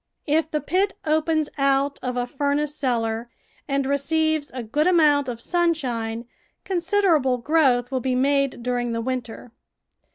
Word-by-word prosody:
If 310 +2 +1
the 300 -1 -1
pit 390 +4 0
opens 310 0 +1
out 275 +1 +1
of 250 -1 -3
a 245 - 0
furnace 285 +2 -1
cellar 235 -4 -1 0.4
and 275 -1 0
receives 310 +2 0
a 250 -1 -6
good 295 +9 0
amount 300 -6 +4
of 235 -2 -5
sunshine, 245 -8 -1 0.4
considerable 340 -8 +2
growth 255 -3 +2
will 260 - 0
be 255 +1 -1
made 275 -1 +1
during 245 -1 -1
the 230 - -2
winter. 245 -1 -5
275 Hz, 140 wpm, -23 LUFS, 245-310 Hz, 0.4 s, amount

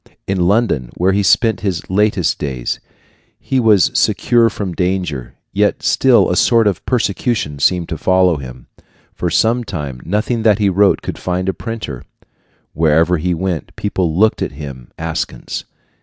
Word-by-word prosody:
In 95 -3 0
London, 100 - +1
where 90 +2 +2
he 100 - +2
spent 100 +3 +3
his 95 -4 -3
latest 100 -2 +1
days, 65 -4 -3 0.6
he 135 - -1
was 110 -5 +4
secure 120 -1 +3
from 100 -4 -5
danger, 90 -7 -2 0.2
yet - - +1
still - - +4
a - - +1
sort 115 -2 +4
of 100 -2 0
persecution 105 - -1
seemed 85 +3 +2
to 80 -3 -4
follow 95 -3 +3
him. 65 -3 -10 0.5
For 90 - -2
some 115 +8 +2
time, 70 - -6
nothing 105 +6 -1
that 110 -2 +4
he 105 -2 +2
wrote 100 +2 +2
could - - -5
find 90 +1 -2
a 95 - +1
printer. 110 - -6 0.7
Wherever 80 +2 +2
he 90 +2 0
went, 85 -2 -4
people 90 -5 -1
looked 110 +2 +3
at - - -2
him 70 -4 -9
askance. 80 -1 -4
95 Hz, 155 wpm, -17 LUFS, 80-105 Hz, 0.7 s, was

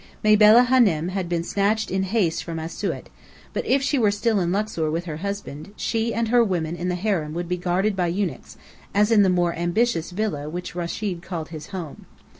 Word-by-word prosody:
Mabella 215 +3 +7
Hânem 200 -11 +3
had 185 -2 -3
been 170 -1 0
snatched 205 +4 0
in 190 +1 0
haste 190 -4 0
from 165 -1 -5
Asiut, 160 +1 -4 0.5
but - - -2
if 270 +1 +3
she 280 0 +1
were 215 -3 +4
still 205 +1 +1
in 175 -1 0
Luxor 200 -5 -1
with 165 +3 -2
her 155 -3 -5
husband, 200 -2 -6
she 225 0 -1
and 230 0 -1
her 240 0 +5
women 175 -6 -1
in 175 +1 -3
the 180 - 0
harem 175 -5 -1
would 175 0 -3
be 180 - 0
guarded 180 +4 0
by 180 -2 0
eunuchs, 175 -5 -3 0.4
as 210 +2 +3
in 220 -2 +6
the 195 - +4
more 175 -1 +2
ambitious 175 +2 0
villa 175 -7 -3
which 180 +3 -6
Rechid 175 +1 -3
called 170 -3 -5
his 155 -2 -8
home. 175 -6 -8
185 Hz, 205 wpm, -23 LUFS, 170-215 Hz, 0.5 s, Mabella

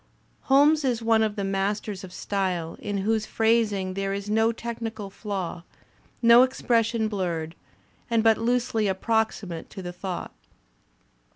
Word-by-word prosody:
Holmes 290 +3 +5
is 240 -4 0
one 225 -1 +4
of 215 -1 0
the 200 - -3
masters 195 +1 -2
of 185 - -9
style 180 -4 -2
in 205 -1 -3
whose 220 0 +1
phrasiag 220 -4 +1
there 195 0 -2
is 200 +1 -5
no 220 +1 +3
technical 225 -3 -6
flaw, 190 -5 -4 0.6
no 235 +1 +8
expression 230 -3 +1
blurred 170 -6 -3 0.6
and 230 -2 +2
but 225 -1 +4
loosely 230 -2 +1
approximate 195 -3 -1
to 190 - -8
the 175 0 -6
thought. 180 0 -5
215 Hz, 135 wpm, -25 LUFS, 195-230 Hz, 0.6 s, no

